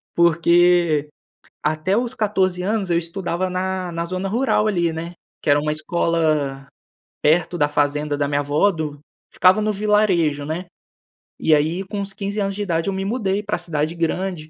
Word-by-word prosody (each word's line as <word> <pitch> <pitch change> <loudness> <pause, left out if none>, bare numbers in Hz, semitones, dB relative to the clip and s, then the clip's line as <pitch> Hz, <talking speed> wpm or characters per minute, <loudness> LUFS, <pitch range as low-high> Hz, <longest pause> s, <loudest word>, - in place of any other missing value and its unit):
Porque 170 -2 +3 0.5
até 155 +7 0
os 240 0 -1
14 190 -6 0
anos 200 0 -1
eu 170 - +3
estudava 175 +1 -2
na 185 -1 -2
na 170 0 -3
zona 185 +2 -3
rural 225 -2 +1
ali, 170 -5 +1
né, 170 +2 -6 0.3
que - - -2
era 145 0 +5
uma 150 +1 -1
escola 155 -3 0 0.6
perto 170 +3 +2
da 145 -3 +2
fazenda 145 0 0
da 140 -1 0
minha 145 0 0
vó 145 +8 +2
do 150 -3 -5 0.3
ficava 185 +3 +4
no 215 0 +1
vilarejo, 195 -8 +2
né, 160 +5 -4 0.7
e 160 - +3
aí, 160 +6 0
com 205 0 -4
uns 200 0 -3
15 200 +1 -4
anos 195 -1 -1
de 205 - -4
idade 165 -2 -1
eu 195 - -2
me 190 0 -3
mudei 205 -3 -1
pra 210 +1 -1
cidade 165 -2 -2
grande, 170 -1 -2
175 Hz, 175 wpm, -21 LUFS, 155-195 Hz, 0.7 s, era